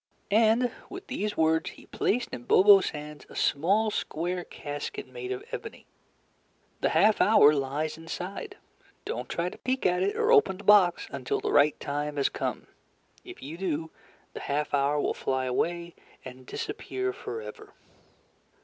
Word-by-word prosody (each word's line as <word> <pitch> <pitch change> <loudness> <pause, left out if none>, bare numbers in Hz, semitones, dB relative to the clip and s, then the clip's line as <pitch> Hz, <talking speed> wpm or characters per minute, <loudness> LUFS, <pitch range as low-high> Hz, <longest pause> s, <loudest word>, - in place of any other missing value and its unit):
And, 225 +3 +4 0.2
with 375 0 -8
these 210 -5 -3
words, 160 0 +2
he - - -14
placed 245 +3 -1
in 120 - -7
Bobo's 195 0 +6
hands 150 0 -9
a - - -13
small 200 +9 +2
square 175 0 -3
casket 145 -3 -6
made 395 -6 -7
of 395 +1 -4
ebony. 465 -2 -7 0.9
"The - - +1
half 215 0 +4
hour 155 -9 +6
lies 145 +3 -2
inside. 175 +4 -6 0.5
Don't 125 +1 -4
try 170 +1 -1
to - - -13
peek 260 +1 -2
at 180 0 +2
it 195 +2 0
or 450 +1 +2
open 425 - +5
the 205 - -12
box 200 -4 +5
until 135 -2 -2
the - - -2
right 145 +1 +4
time 145 +1 -3
has 140 - +2
come. - - -4 0.6
If - - -11
you 155 +5 -8
do, 160 -4 -2 0.4
the - - -6
half 145 +1 -2
hour 145 +1 +2
will - - 0
flyaway 165 +7 -2 0.3
and 130 0 -11
disappear 130 -1 -4
forever." 110 -4 -8
165 Hz, 155 wpm, -28 LUFS, 145-205 Hz, 0.9 s, Bobo's